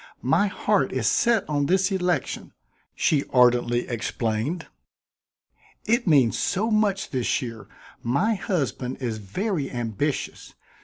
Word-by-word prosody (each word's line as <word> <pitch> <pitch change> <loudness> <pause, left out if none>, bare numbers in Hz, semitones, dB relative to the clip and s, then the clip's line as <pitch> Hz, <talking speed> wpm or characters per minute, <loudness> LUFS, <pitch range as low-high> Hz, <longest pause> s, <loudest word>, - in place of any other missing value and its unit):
"My 205 - +3
heart 200 -5 +1
is 130 -3 -2
set 230 - +2
on 145 -2 0
this 190 +2 +2
election," 180 -6 -1 0.4
she 145 -3 +2
ardently 120 -1 +3
explained. 115 +6 -2 1.2
"It 235 0 +1
means 135 -8 +4
so 220 +5 0
much 205 -3 +1
this 125 -3 0
year. 115 -4 -7 0.3
My 155 - +1
husband 140 - -2
is 115 -4 -3
very 150 - -2
ambitious. 120 +4 -3
145 Hz, 115 wpm, -25 LUFS, 120-195 Hz, 1.2 s, means